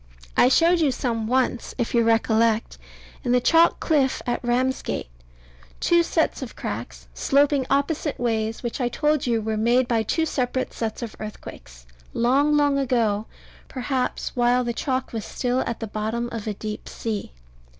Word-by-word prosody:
I 250 Hz, -, +5 dB
showed 335 Hz, +5 st, +4 dB
you 300 Hz, -4 st, +3 dB
some 230 Hz, -3 st, -2 dB
once, 250 Hz, -1 st, 0 dB
if 240 Hz, -3 st, -2 dB
you 235 Hz, -1 st, +4 dB
recollect, 225 Hz, 0 st, +2 dB, 0.4 s
in 245 Hz, -2 st, +1 dB
the 250 Hz, -, +5 dB
chalk 330 Hz, +6 st, +4 dB
cliff 280 Hz, -5 st, +1 dB
at 240 Hz, -, -2 dB
Ramsgate 245 Hz, -, -1 dB, 0.7 s
two 345 Hz, 0 st, +4 dB
set 330 Hz, -3 st, 0 dB
of 260 Hz, -, -7 dB
cracks, 105 Hz, -, -6 dB
sloping 280 Hz, -, +2 dB
opposite 285 Hz, +2 st, 0 dB
ways, 225 Hz, -1 st, -1 dB
which 240 Hz, +2 st, -3 dB
I 245 Hz, -, +1 dB
told 300 Hz, +1 st, 0 dB
you 230 Hz, -2 st, +1 dB
were 220 Hz, 0 st, -1 dB
made 240 Hz, +3 st, +3 dB
by 230 Hz, -2 st, +2 dB
two 320 Hz, +9 st, 0 dB
separate 255 Hz, -3 st, -2 dB
sets 225 Hz, 0 st, -4 dB
of 225 Hz, -, -6 dB
earthquakes, 60 Hz, -, -10 dB, 0.3 s
long, 280 Hz, +5 st, +3 dB
long 285 Hz, -1 st, +3 dB
ago, 225 Hz, -5 st, +1 dB, 0.4 s
perhaps 255 Hz, 0 st, -2 dB
while 245 Hz, 0 st, +3 dB
the 240 Hz, -1 st, -2 dB
chalk 260 Hz, +1 st, -2 dB
was 225 Hz, -2 st, -3 dB
still 250 Hz, 0 st, -1 dB
at 235 Hz, -, -3 dB
the 225 Hz, -, -3 dB
bottom 220 Hz, +3 st, -3 dB
of 225 Hz, -2 st, -5 dB
a 210 Hz, -, -2 dB
deep 215 Hz, +1 st, -6 dB
sea. 220 Hz, -3 st, -4 dB
240 Hz, 165 wpm, -24 LUFS, 225-270 Hz, 0.7 s, I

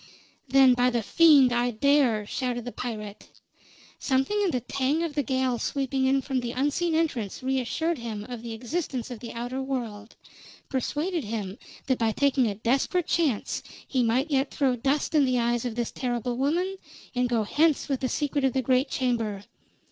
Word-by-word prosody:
"Then, 265 Hz, 0 st, +6 dB
by 245 Hz, 0 st, +3 dB
the 235 Hz, -2 st, -1 dB
fiend, 285 Hz, -2 st, +6 dB
I 240 Hz, +1 st, +2 dB
dare!" 245 Hz, -2 st, +2 dB
shouted 245 Hz, +1 st, -3 dB
the 245 Hz, -, -4 dB
pirate. 215 Hz, -5 st, -6 dB, 0.7 s
Something 270 Hz, +11 st, +1 dB
in 400 Hz, -, +2 dB
the 255 Hz, -6 st, -1 dB
tang 275 Hz, +6 st, 0 dB
of 330 Hz, -3 st, -3 dB
the 290 Hz, -, +1 dB
gale 260 Hz, -2 st, 0 dB
sweeping 270 Hz, 0 st, -1 dB
in 270 Hz, 0 st, +2 dB
from 265 Hz, -2 st, -1 dB
the 240 Hz, -1 st, -4 dB
unseen 295 Hz, +5 st, 0 dB
entrance 255 Hz, -, -1 dB
reassured 265 Hz, +5 st, -1 dB
him 220 Hz, -3 st, -5 dB
of 245 Hz, -3 st, -6 dB
the 230 Hz, -1 st, -6 dB
existence 255 Hz, +1 st, -4 dB
of 240 Hz, -, -6 dB
the 235 Hz, 0 st, -7 dB
outer 245 Hz, +3 st, -4 dB
world; 235 Hz, -5 st, -5 dB, 0.5 s
persuaded 300 Hz, +4 st, -2 dB
him 205 Hz, -2 st, -4 dB, 0.3 s
that 260 Hz, -2 st, 0 dB
by 225 Hz, -2 st, +1 dB
taking 270 Hz, -2 st, +2 dB
a 205 Hz, -, -2 dB
desperate 265 Hz, -, 0 dB
chance 305 Hz, -12 st, 0 dB, 0.3 s
he 260 Hz, -, +1 dB
might 250 Hz, +6 st, +1 dB
yet 270 Hz, 0 st, +2 dB
throw 265 Hz, -3 st, +1 dB
dust 275 Hz, +6 st, 0 dB
in 300 Hz, -2 st, +5 dB
the 255 Hz, -2 st, +2 dB
eyes 240 Hz, 0 st, 0 dB
of 235 Hz, -3 st, -3 dB
this 240 Hz, -1 st, -2 dB
terrible 245 Hz, -1 st, -2 dB
woman 345 Hz, +9 st, 0 dB, 0.4 s
and 250 Hz, -1 st, +1 dB
go 230 Hz, -2 st, +1 dB
hence 300 Hz, +7 st, +2 dB
with 275 Hz, -3 st, -1 dB
the 260 Hz, -, -1 dB
secret 290 Hz, +1 st, -1 dB
of 265 Hz, -2 st, +2 dB
the 265 Hz, -, 0 dB
great 255 Hz, +2 st, +2 dB
chamber. 230 Hz, -6 st, -1 dB
255 Hz, 185 wpm, -26 LUFS, 235-280 Hz, 0.7 s, Then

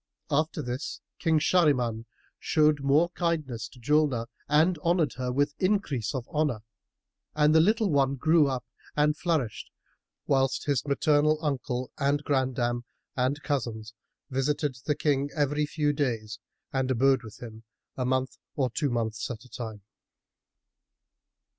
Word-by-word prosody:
After 155 Hz, +1 st, 0 dB
this 125 Hz, +4 st, -4 dB, 0.2 s
King 165 Hz, -2 st, +2 dB
Shahriman 130 Hz, -9 st, +2 dB, 0.3 s
showed 155 Hz, -1 st, +3 dB
the -, -, -9 dB
more 145 Hz, +5 st, +3 dB
kindness 155 Hz, -11 st, -2 dB
to 125 Hz, -, -17 dB
Julnar 140 Hz, -2 st, +2 dB, 0.2 s
and 160 Hz, +3 st, +3 dB
honoured 170 Hz, 0 st, +1 dB
her 125 Hz, -1 st, -2 dB
with 145 Hz, +3 st, +1 dB
increase 155 Hz, -, 0 dB
of 125 Hz, -2 st, -4 dB
honour; 150 Hz, -8 st, 0 dB, 0.7 s
and 150 Hz, 0 st, +4 dB
the 160 Hz, -, +6 dB
little 215 Hz, +3 st, +3 dB
one 140 Hz, -1 st, +2 dB
grew 155 Hz, +2 st, +4 dB
up 130 Hz, -2 st, -3 dB, 0.3 s
and 150 Hz, 0 st, +3 dB
flourished, 155 Hz, -9 st, -2 dB, 0.6 s
whilst 135 Hz, -1 st, +1 dB
his 140 Hz, -2 st, 0 dB
maternal 150 Hz, +2 st, +3 dB
uncle 130 Hz, -3 st, -2 dB
and 145 Hz, +1 st, +1 dB
grandam 125 Hz, -4 st, 0 dB, 0.3 s
and 135 Hz, +3 st, 0 dB
cousins 115 Hz, -6 st, -3 dB, 0.4 s
visited 135 Hz, +1 st, 0 dB
the 150 Hz, -, +2 dB
King 140 Hz, -1 st, +1 dB
every 150 Hz, 0 st, +1 dB
few 150 Hz, -1 st, 0 dB
days 115 Hz, -6 st, -2 dB, 0.3 s
and 130 Hz, -1 st, 0 dB
abode 130 Hz, +1 st, +3 dB
with 110 Hz, -3 st, -11 dB
him 110 Hz, -2 st, -9 dB, 0.3 s
a 130 Hz, -, -2 dB
month 130 Hz, 0 st, -1 dB, 0.2 s
or 130 Hz, -4 st, 0 dB
two 145 Hz, +4 st, 0 dB
months 115 Hz, -2 st, -2 dB
at 115 Hz, -1 st, -7 dB
a -, -, -17 dB
time. 110 Hz, -5 st, -7 dB
140 Hz, 140 wpm, -28 LUFS, 125-150 Hz, 0.7 s, the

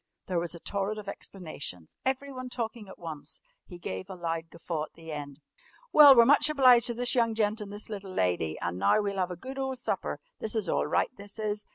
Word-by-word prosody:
There 180 Hz, -2 st, 0 dB
was 170 Hz, 0 st, -4 dB
a -, -, -9 dB
torrent 200 Hz, +4 st, -2 dB
of 210 Hz, -2 st, -8 dB
explanations, 155 Hz, -, -7 dB
everyone 265 Hz, -1 st, -2 dB
talking 230 Hz, -3 st, -4 dB
at -, -, -11 dB
once. 160 Hz, -4 st, -7 dB, 0.3 s
He 175 Hz, -, -9 dB
gave 95 Hz, -, -6 dB
a -, -, -6 dB
loud 165 Hz, -2 st, -3 dB
guffaw 165 Hz, -2 st, -4 dB
at -, -, -23 dB
the 165 Hz, -1 st, -10 dB
end. 145 Hz, -1 st, -6 dB, 0.5 s
"Well, 290 Hz, -3 st, +10 dB
we're 235 Hz, -1 st, +8 dB
much 290 Hz, +3 st, +5 dB
obliged 255 Hz, -5 st, +6 dB
to 235 Hz, -, -1 dB
this 245 Hz, +1 st, +3 dB
young 230 Hz, -3 st, +2 dB
gent 215 Hz, 0 st, +1 dB
and 205 Hz, -1 st, -7 dB
this 205 Hz, +1 st, -6 dB
little 200 Hz, -3 st, -6 dB
lady, 90 Hz, -, 0 dB
and 85 Hz, +1 st, -2 dB
now 100 Hz, -, +4 dB
we'll 200 Hz, -2 st, -1 dB
'ave 180 Hz, -1 st, 0 dB
a -, -, -19 dB
good 265 Hz, +7 st, -7 dB
ole 265 Hz, -1 st, -1 dB
supper. 250 Hz, -, -3 dB, 0.2 s
This 220 Hz, +1 st, -3 dB
is 215 Hz, -3 st, 0 dB
all -, -, +1 dB
right, -, -, +1 dB
this 200 Hz, +1 st, -9 dB
is! 210 Hz, -1 st, -3 dB
200 Hz, 225 wpm, -29 LUFS, 165-235 Hz, 0.5 s, Well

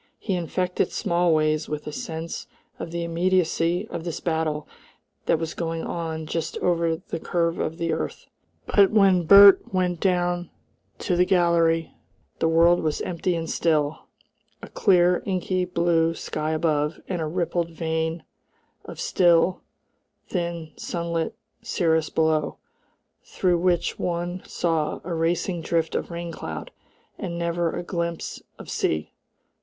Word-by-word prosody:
He 200 Hz, -, -3 dB
infected 180 Hz, +1 st, -1 dB
Smallways 155 Hz, -3 st, +1 dB
with 150 Hz, 0 st, -4 dB
a 150 Hz, -, -5 dB
sense 160 Hz, +2 st, -5 dB, 0.3 s
of -, -, -5 dB
the 170 Hz, +1 st, -3 dB
immediacy 175 Hz, +2 st, +1 dB
of 170 Hz, -, -5 dB
this 170 Hz, -2 st, -4 dB
battle 160 Hz, -3 st, -1 dB, 0.6 s
that -, -, +4 dB
was 160 Hz, 0 st, -4 dB
going 165 Hz, -1 st, -3 dB
on 160 Hz, -2 st, -4 dB
just 165 Hz, +1 st, -3 dB
over 170 Hz, -2 st, +1 dB
the 165 Hz, 0 st, -6 dB
curve 170 Hz, 0 st, -1 dB
of 160 Hz, +1 st, -2 dB
the 165 Hz, -1 st, -1 dB
earth. -, -, -4 dB, 0.4 s
But 200 Hz, -2 st, +5 dB
when 190 Hz, -5 st, +4 dB
Bert 200 Hz, +1 st, +8 dB
went 180 Hz, -2 st, 0 dB
down 175 Hz, -1 st, 0 dB, 0.5 s
to 180 Hz, -, -1 dB
the 180 Hz, -, +4 dB
gallery 170 Hz, -3 st, +2 dB, 0.5 s
the -, -, +2 dB
world 170 Hz, +2 st, +5 dB
was 155 Hz, -2 st, -1 dB
empty 175 Hz, 0 st, -1 dB
and 165 Hz, -1 st, -3 dB
still, 155 Hz, -3 st, 0 dB, 0.6 s
a -, -, -8 dB
clear 180 Hz, -3 st, +3 dB
inky 185 Hz, -1 st, 0 dB
blue 170 Hz, -2 st, +1 dB
sky 155 Hz, -1 st, -3 dB
above 155 Hz, -1 st, 0 dB
and 180 Hz, -3 st, -2 dB
a 155 Hz, -, -1 dB
rippled 170 Hz, 0 st, -1 dB
veil 160 Hz, 0 st, -2 dB, 0.6 s
of -, -, -9 dB
still, 175 Hz, 0 st, +3 dB, 0.7 s
thin 170 Hz, -3 st, -3 dB
sunlit 170 Hz, -1 st, -3 dB, 0.3 s
cirrus 160 Hz, -8 st, +1 dB
below, 160 Hz, -1 st, +1 dB, 0.7 s
through 180 Hz, -2 st, 0 dB
which 175 Hz, -1 st, +1 dB
one 175 Hz, +1 st, -2 dB
saw 160 Hz, -3 st, -1 dB
a 175 Hz, -, -4 dB
racing 170 Hz, +2 st, 0 dB
drift 165 Hz, 0 st, 0 dB
of -, -, -2 dB
rain 170 Hz, 0 st, -5 dB
cloud, 80 Hz, -, -6 dB, 0.5 s
and 170 Hz, -, -4 dB
never 170 Hz, 0 st, 0 dB
a 175 Hz, -, -3 dB
glimpse 170 Hz, -2 st, -4 dB, 0.2 s
of -, -, -11 dB
sea. 80 Hz, -1 st, -1 dB
170 Hz, 140 wpm, -24 LUFS, 160-175 Hz, 0.7 s, Bert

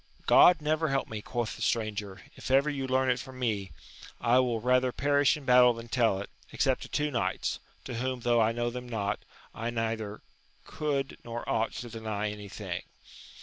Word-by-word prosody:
God 175 Hz, -4 st, +7 dB
never 155 Hz, +1 st, +1 dB
help 135 Hz, 0 st, 0 dB
me, 110 Hz, -1 st, -5 dB
quoth 120 Hz, 0 st, -3 dB
the -, -, -11 dB
stranger, 105 Hz, -4 st, -2 dB
if -, -, -7 dB
ever 140 Hz, +3 st, +4 dB
you 135 Hz, -2 st, -3 dB
learn 130 Hz, 0 st, +2 dB
it 125 Hz, -, 0 dB
from 130 Hz, +2 st, -9 dB
me: 105 Hz, -6 st, -1 dB, 0.5 s
I 120 Hz, +1 st, +4 dB
will 120 Hz, -3 st, +1 dB
rather 125 Hz, +2 st, +2 dB
perish 145 Hz, +2 st, +3 dB
in 145 Hz, -, -11 dB
battle 125 Hz, -1 st, +7 dB
than 115 Hz, 0 st, -9 dB
tell 115 Hz, -6 st, +2 dB
it, 100 Hz, -, -7 dB, 0.2 s
except -, -, +1 dB
to -, -, -8 dB
two 150 Hz, 0 st, 0 dB
knights, 120 Hz, -3 st, -1 dB, 0.3 s
to 130 Hz, -, -5 dB
whom, 125 Hz, +1 st, -2 dB
tho' 120 Hz, -1 st, +3 dB
I 110 Hz, 0 st, +3 dB
know 120 Hz, +1 st, -1 dB
them 125 Hz, 0 st, -7 dB
not, 105 Hz, -3 st, -1 dB, 0.3 s
I 115 Hz, +2 st, -3 dB
neither 110 Hz, -2 st, -3 dB, 0.4 s
could 140 Hz, -3 st, -2 dB
nor 120 Hz, 0 st, -6 dB
ought 110 Hz, 0 st, 0 dB
to 120 Hz, -, -6 dB
deny 110 Hz, -2 st, -3 dB
any 105 Hz, -1 st, -8 dB
thing. 95 Hz, -, -5 dB
120 Hz, 190 wpm, -29 LUFS, 110-130 Hz, 0.5 s, God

